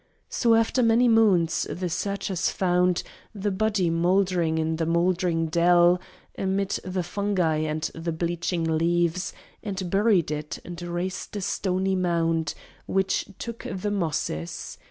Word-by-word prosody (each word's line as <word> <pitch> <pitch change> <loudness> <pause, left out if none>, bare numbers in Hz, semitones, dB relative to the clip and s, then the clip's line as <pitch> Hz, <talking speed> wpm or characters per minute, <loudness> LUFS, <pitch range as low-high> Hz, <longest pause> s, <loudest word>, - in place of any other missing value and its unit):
So, 230 -2 +3
after 225 +3 +2
many 235 +1 +4
moons, 205 -8 +3
the 180 0 -3
searchers 190 0 -1
found 180 -1 +1 0.3
The 205 0 -1
body 195 -3 +1
mouldering 175 -1 +2
in 160 0 0
the 165 -1 -1
mouldering 170 0 +1
dell 175 +2 +4 0.3
Amidst 195 0 -1
the 185 0 -2
fungi 180 -3 0
and 155 0 -2
the 165 +1 -4
bleaching 170 +1 -2
leaves, 170 +2 +1 0.3
And 190 -4 -4
buried 195 -6 +3
it, 150 0 -4
and 175 0 -7
raised 175 +3 -4
a 205 - -3
stony 190 0 0
mound 165 -3 0 0.3
Which 195 0 0
took 235 -1 -6
the 195 +2 -3
mosses. 155 - -3
180 Hz, 135 wpm, -25 LUFS, 165-195 Hz, 0.3 s, many